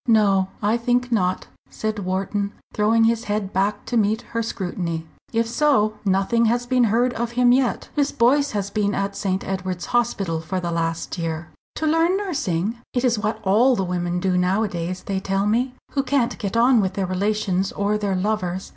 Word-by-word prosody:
"No, 200 -4 +4 0.2
I 215 +3 +2
think 245 +1 0
not," 185 -5 +1 0.2
said 215 -1 -3
Wharton, 195 +2 -2 0.2
throwing 220 +2 +3
his 230 +1 +2
head 205 -2 -2
back 195 +3 0
to 245 - -3
meet 220 -1 +2
her 230 - 0
scrutiny. 175 -7 -3 0.3
"If 230 0 +1
so, 235 -4 +2
nothing 195 +4 +2
has 240 +2 +1
been 250 -1 +3
heard 240 +3 +2
of 235 0 -3
him 245 0 +4
yet. 255 -1 +1
Miss 290 -1 +1
Boyce 280 +5 +3
has 200 -1 -2
been 205 -1 0
at 195 0 -2
St. 190 -2 -1
Edward's 185 -2 -3
Hospital 195 -9 0
for 175 +4 -3
the 170 -1 -3
last 165 +1 -2
year." 165 -1 -3 0.3
"To 315 - -2
learn 330 +4 +3
nursing? 235 - -2 0.2
It 245 +1 +1
is 235 -3 +2
what 215 +1 -2
all 230 +7 +4
the 195 - 0
women 175 -1 -1
do 180 -1 +1
nowadays, 180 -2 -1
they 195 -1 -2
tell 195 +1 -1
me, 245 +5 +1 0.2
who 275 - +1
can't 270 -3 0
get 205 -1 -2
on 240 0 +5
with 190 -1 -2
their 195 - 0
relations 195 0 0
or 205 +1 0
their 205 -2 -1
lovers. 185 -2 -2
210 Hz, 190 wpm, -22 LUFS, 190-235 Hz, 0.3 s, on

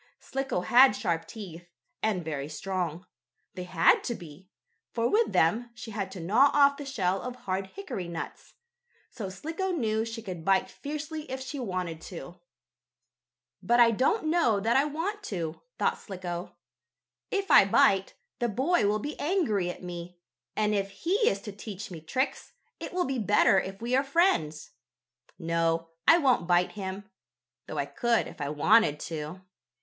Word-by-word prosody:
Slicko 270 -8 -2
had 245 +5 +6
sharp 165 -5 -1
teeth, 175 -5 -9 0.3
and 195 -6 0
very 145 -2 -4
strong. 175 +1 -3 0.5
They 180 -1 -6
had 175 -2 +4
to 235 - -2
be, 175 +2 -12 0.4
for 230 0 0
with 445 - +2
them 225 +9 +2
she 230 - -8
had 200 -2 -3
to 190 - -7
gnaw 220 +12 +4
off 280 -1 +5
the 290 - -7
shell 195 -8 0
of 250 0 -5
hard 190 -4 -3
hickory 245 - -6
nuts. 170 -1 -7 0.6
So 205 -5 -5
Slicko 325 - -4
knew 220 -11 0
she 225 0 -6
could 180 -5 -6
bite 195 +1 +2
fiercely 305 +1 -6
if 260 +1 -4
she 265 +2 -6
wanted 180 -8 -3
to. 175 0 -9 1.2
"But 240 +1 +3
I 235 -1 +7
don't 270 - +1
know 310 -10 +3
that 225 +4 +1
I 275 - +4
want 335 +8 -3
to," 165 -5 -4 0.2
thought - - 0
Slicko. 180 -3 -6 0.7
"If 395 0 -1
I - - +9
bite, 195 0 +3 0.2
the 240 -1 +1
boy 250 - +2
will 210 +1 +2
be 290 +8 -6
angry 285 - +1
at 180 - -7
me, 175 0 -7 0.4
and 215 0 +1
if 195 -1 0
he 325 - -3 0.2
is 195 - -2
to 210 - -7
teach 205 -1 -8
me 165 -3 -8
tricks, 255 - -2 0.3
it - - -6
will 360 0 0
be 265 -1 -2
better 205 -2 +4
if 195 +3 -6
we 245 +2 +1
are 270 - +3
friends. 275 - +1 0.7
No, 165 -1 0 0.2
I 330 - +8
won't 255 - +2
bite 175 0 +3
him, 195 0 -6 0.6
though 155 - -6
I 140 - 0
could 230 +12 +1
if - - -11
I 140 - -2
wanted 150 +2 +4
to." 160 +2 -5
200 Hz, 170 wpm, -28 LUFS, 175-260 Hz, 1.2 s, I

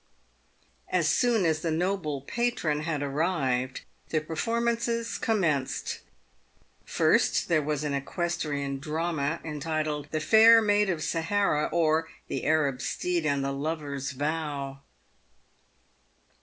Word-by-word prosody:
As 175 -4 +2
soon 230 +2 +3
as 160 -1 +2
the 165 - -1
noble 160 -3 -1
patron 200 - -1
had 155 -2 -2
arrived, 135 -4 -1 0.3
the 155 - +1
performances 230 +6 -1
com 220 -3 +1
menced. 145 -6 -1 0.9
Eirst, - - +2
there 165 -3 +2
was 150 0 -2
an 150 -1 -1
equestrian 145 -2 -2
drama, 160 0 -2
entitled, 155 -1 -2
" - - -34
The 155 - 0
Pair 225 +7 +7
Maid 205 -2 +2
of 170 -4 -1
Sahara, 165 -2 +1
or 160 -1 +2 0.2
the - - -3
Arab 145 -4 +2
Steed 175 0 -1
and 140 -2 +1
the 140 - -1
Lover's 145 -1 -3
Vow." 145 -1 -3
155 Hz, 120 wpm, -28 LUFS, 145-180 Hz, 0.9 s, Pair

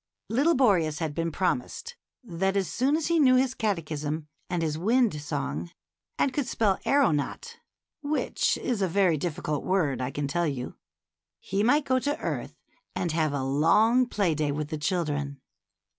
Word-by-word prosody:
Little 280 +9 +3
Boreas 180 - +3
had 160 -2 -3
been 165 +1 -2
promised 250 - -2 0.3
that 195 -1 -1
as 195 -2 0
soon 275 +5 +2
as 320 - -2
he 335 -1 +2
knew 260 -4 +6
his 260 0 +2
catechism 155 - -3 0.2
and 175 -2 -1
his 155 -2 -1
wind 215 -2 +2
song, 135 - -3 0.5
and 270 - +1
could 275 -2 -1
spell 210 -5 +1
aeronaut, 275 - +1 0.2
— - - -65 0.2
which 300 +1 0
is 235 -5 -2
a 190 - +2
very 185 -1 +3
difficult 155 -2 -3
word, 160 -9 0
I 125 - -1
can 145 +1 -3
tell 170 +4 0
you, 130 -4 -4 0.3
— - - -66 0.3
he 195 +1 -2
might 285 +7 +3
go 260 -1 +2
to 290 +3 -2
earth - - -4 0.4
and 175 -2 -1
have 155 -1 +1
a 140 -2 -2
long 210 - +3
play 200 -8 +1
day 150 -1 0
with 150 +1 -3
the 155 - -3
children. 145 -4 -2
175 Hz, 175 wpm, -27 LUFS, 150-245 Hz, 0.5 s, knew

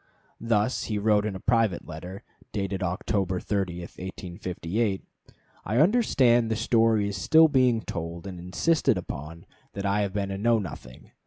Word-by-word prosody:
Thus 115 +1 0
he 105 - -2
wrote 105 0 +2
in 100 - -4
a - - -6
private 115 -4 +1
letter, 90 +5 -8 0.3
dated 95 -1 -3
October 95 +1 -1
30, 95 -4 -2
1858: 95 +3 -4 0.6
"I 110 +4 -1
understand 130 - +4
the 110 - 0
story 115 -2 +2
is 100 -2 -4
still 160 - +6
being 130 -6 +3
told 85 -1 -6
and 95 -2 -7
insisted 125 - +1
upon 75 +4 -7 0.3
that 100 - -5
I 100 +1 +1
have 100 -2 -2
been 100 -1 -2
a 95 - -4
Know 115 +2 +3
Nothing. 75 - -8
100 Hz, 155 wpm, -26 LUFS, 90-115 Hz, 0.6 s, still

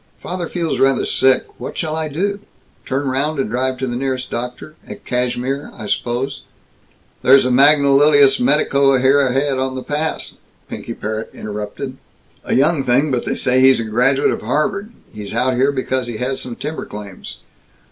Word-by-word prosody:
"Father 175 -2 -5
feels 170 -3 -2
rather 135 0 +2
sick. 130 -1 +3
What - - -7
shall 155 -1 -2
I 160 -1 -2
do? 200 +7 -2 0.5
Turn 135 +2 -1
round 140 +4 -1
and 130 - -2
drive 130 +1 -1
to 130 - -3
the 120 -2 -3
nearest 130 0 -3
doctor 125 +5 -5 0.2
at - - -10
Cashmere, 125 +3 -2
I 110 - -8
suppose?" 120 +5 -2 0.8
"There's 135 0 +6
a 130 - +1
magnolious 140 0 +5
medico 140 +1 +3
ahead 135 0 +3
here 135 -1 +1
on 130 0 -2
the 130 - -5
pass," 155 +2 -3 0.3
Pinky - - -7
Parrott 110 +1 -4
interrupted. 105 +5 -6 0.5
"A - - -1
young 145 +2 +2
thing, 135 +4 +2
but 125 -2 -1
they - - -1
say 125 0 +1
he's 130 -1 +6
a - - -1
graduate 125 +5 +2
of - - -4
Harvard. 155 - -1 0.2
He's 105 0 -7
out 130 +2 +2
here 130 +3 +2
because 130 -2 -2
he 120 -2 -5
has 130 +3 -2
some 120 -2 -6
timber 155 +6 -5
claims. 105 -3 -9
130 Hz, 175 wpm, -18 LUFS, 125-145 Hz, 0.8 s, There's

